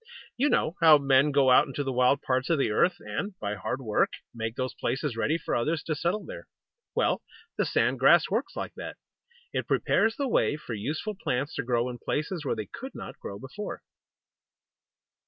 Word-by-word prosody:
You 280 +4 +2
know 175 - +1
how 160 -2 +9
men 140 +1 +4
go 135 -2 +4
out 125 - +6
to 145 - -1
the 135 - -2
wild 125 +3 +3
parts 130 +2 0
of 165 - +3
the 135 - +1
earth 175 +12 +3
and, 200 -2 -4
by 100 0 -2
hard 105 +6 -4
work, 110 -3 +1 0.2
make 115 -1 -4
those 130 0 -2
places 130 +1 -2
ready 145 +8 +1
for - - -3
others 155 +6 0
to 160 - -1
settle 175 +7 -1
there. - - -9 0.5
Well, - - +2 0.3
the - - +1
sand - - +1
grass - - +6
works - - -2
like - - -4
that. - - -7 0.6
It - - -2
prepares 225 0 +2
the 280 - -1
way 185 - +2
for 150 -6 -7
useful 150 - -3
plants 140 -7 -2
to 145 - -2
grow 120 0 +1
in 125 -1 -6
places 155 +2 -2
where 135 - -1
they 110 -1 -4
could - - -9
not - - -8
grow 100 - -7
before. 135 - -7
140 Hz, 195 wpm, -28 LUFS, 120-165 Hz, 0.6 s, how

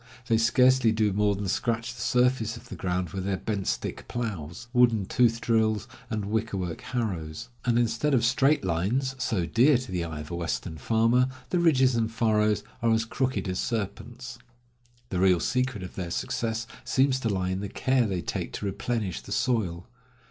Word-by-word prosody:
They 115 -1 +3
scarcely 125 +1 +4
do 110 -2 +1
more 105 0 +2
than 100 0 -4
scratch 115 +3 -1
the 120 - -9
surface 125 -1 +2
of - - -14
the - - -6
ground 90 -2 -2
with 95 0 -4
their 95 0 -1
bent 100 -1 -3
stick - - -3
plows, 105 -3 -5
wooden 120 -5 +4
tooth 115 +2 +2
drills, 110 -3 +1 0.2
and 110 -3 -2
wicker 110 0 -1
work 90 -3 -4
harrows; 105 -5 -4 0.2
and 120 -1 +2
instead 120 +5 +1
of 120 -2 +3
straight 135 +1 +3
lines, 105 +11 0
so 110 -9 0
dear 125 - +4
to 125 -4 -7
the 90 -2 -1
eye 80 -2 -5
of 75 - -10
a - - -2
Western 80 -2 -3
farmer, 115 +3 +3 0.2
the 180 - +2
ridges 135 -7 +4
and 115 -1 0
furrows 105 -2 +2 0.2
are 115 0 +3
as 115 0 +2
crooked 130 -1 -1
as 90 -1 -2
serpents. 120 +3 -4 0.7
The 90 - -1
real 90 -2 +4
secret 125 0 -1
of 90 - -8
their 90 -3 -4
success 115 +5 -2 0.2
seems 130 0 +2
to 115 - -1
lie 95 -2 0
in 95 - -2
the 100 0 -4
care 130 0 +1
they 90 -4 -2
take - - -4
to - - -4
replenish 100 - -2
the - - -12
soil. 95 -8 0
110 Hz, 190 wpm, -27 LUFS, 95-120 Hz, 0.7 s, scarcely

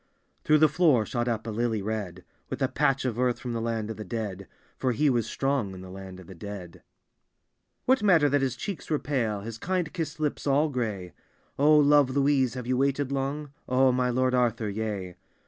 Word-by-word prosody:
Through 155 - +5
the 155 +1 +6
floor 150 -7 +3
shot 120 +1 -2
up 115 -2 -1
a 115 - -3
lily 115 0 0
red. 100 -4 -4 0.2
With - - -4
a - - +3
patch 135 -2 +1
of 120 -2 -2
earth 125 -1 +2
from 120 -2 -5
the 115 - -2
land 115 -1 -2
of - - -7
the 110 - -5
dead. 100 -2 -5 0.3
Far 130 -2 +1
he 145 +3 +2
was 120 -3 0
strong 135 -7 -1
in 90 - -9
the 95 0 -10
land 95 -1 -9
of 95 - -12
the 95 - -11
dead. 90 -1 -9 1.0
What 260 -2 +3
matter 175 -8 +5
that 145 0 +2
his 130 -2 0
cheeks 175 - -6
were 155 - +2
pale. 120 -8 -1
His 115 +2 -7
kind 180 -1 -2
kiss'd 160 -3 -4
lips 150 -1 -2
all 145 +3 +3
gray? 110 -9 -3 0.2
" - - -26
O 150 +2 +6
love 145 -2 +5
Louise, 135 -2 +2
have 125 -2 -5
you 125 +1 0
waited 140 0 0
long? 140 +1 -2
" - - -39
" - - -43
O 130 +1 +4
my 125 0 +1
Lord 130 +1 +1
Ardiur, 115 -3 +1
yea." 100 -5 -4
125 Hz, 220 wpm, -27 LUFS, 110-145 Hz, 1.0 s, the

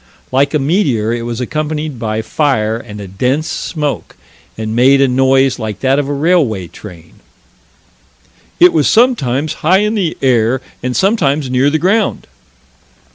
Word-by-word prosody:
Like 140 +3 +1
a - - +5
meteor 135 - 0
it 120 0 -4
was 120 0 -4
accompanied 150 0 -3
by 110 -1 -2
fire 110 -3 0
and 105 -2 -9
a 100 - -7
dense 130 - -1
smoke 150 -4 -4 0.4
and 110 0 -4
made 135 +3 +4
a 135 - +4
noise 135 +1 +2
like 110 -3 -5
that 135 +1 +2
of 145 - -2
a - - -1
railway 140 - +1
train. 85 -6 -13 1.4
"It 180 0 +6
was 150 -3 +2
sometimes 155 - +2
high 185 +5 +3
in 210 - -1
the 190 -7 -2
air 125 -1 +2 0.2
and 125 0 -3
sometimes 155 - +1
near 130 +3 +2
the 155 - +1
ground." 195 +6 0
135 Hz, 155 wpm, -14 LUFS, 115-155 Hz, 1.4 s, It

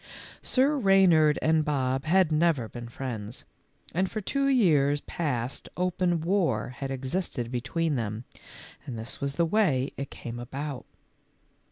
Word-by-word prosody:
Sir 275 +3 +2
Reynard 185 - +5
and 160 0 +3
Bob 135 -2 -1
had 180 0 +3
never 155 -6 +2
been 120 +1 -8
friends, 115 -3 -6 0.5
and 185 +2 +1
for 215 - -4
two 275 +7 0
years 150 - +3
past 130 -6 -3
open 180 -1 0
war 165 - +1
had 135 +2 -6
existed 130 -2 -3
between 135 +5 -1
them, 110 0 -3 0.6
and 125 -4 -5
this 115 +2 -7
was 140 0 -2
the 170 - +2
way 160 -9 +2
it 140 0 -4
came 120 0 -7
about. 135 +3 -6
145 Hz, 140 wpm, -27 LUFS, 125-175 Hz, 0.6 s, Reynard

